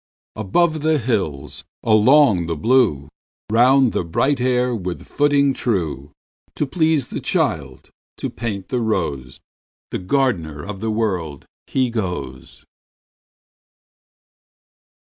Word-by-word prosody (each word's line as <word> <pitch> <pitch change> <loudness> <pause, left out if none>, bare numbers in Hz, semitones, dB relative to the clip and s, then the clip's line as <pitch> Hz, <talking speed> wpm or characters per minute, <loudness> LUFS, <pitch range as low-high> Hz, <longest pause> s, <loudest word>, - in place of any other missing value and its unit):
Above 155 - +1
the 155 0 +2
hills, 80 - -3 0.2
along 110 - +4
the 85 - -2
blue, 100 - +2 0.4
Round 125 +2 +4
the - - 0
bright 130 - 0
air 125 0 +1
with 90 -4 -5
footing 145 -1 +2
true, 80 - -2 0.4
To 150 - 0
please 160 -2 +1
the - - -4
child, 70 -4 -2 0.3
to - - -4
paint 105 -5 -5
the 125 - -1
rose, 75 - -2 0.5
The - - -3
gardener 90 - -1
of 105 -2 -7
the 110 +2 -2
World, 95 -10 -2 0.2
he 130 -3 0
goes. 90 - -5
110 Hz, 110 wpm, -20 LUFS, 85-130 Hz, 0.5 s, along